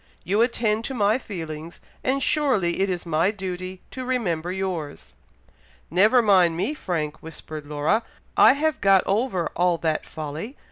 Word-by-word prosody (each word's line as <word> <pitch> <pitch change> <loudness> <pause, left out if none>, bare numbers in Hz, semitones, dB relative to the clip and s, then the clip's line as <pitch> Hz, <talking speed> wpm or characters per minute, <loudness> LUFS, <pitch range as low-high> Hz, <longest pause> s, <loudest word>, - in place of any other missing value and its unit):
You 205 +4 +1
attend 230 -2 +1
to 270 - -4
my 215 +2 +2
feelings, 165 -6 -7 0.2
and 270 +1 +1
surely 230 - +1
it 195 0 +2
is 180 -2 -3
my 165 +2 +2
duty 185 -2 -5
to 260 - -6
remember 180 -10 -1
yours." 185 -6 -4 0.8
"Never 215 +8 +5
mind 180 -6 +4
me, 235 - -1
Frank!" 160 - -3
whispered 155 -2 -9
Laura. 150 +9 +1 0.3
"I - - +7
have 310 +1 -1
got 195 -1 +5
over 195 -4 0
all 175 0 +2
that 160 -1 -1
folly. 155 - -6
185 Hz, 150 wpm, -24 LUFS, 165-225 Hz, 0.8 s, I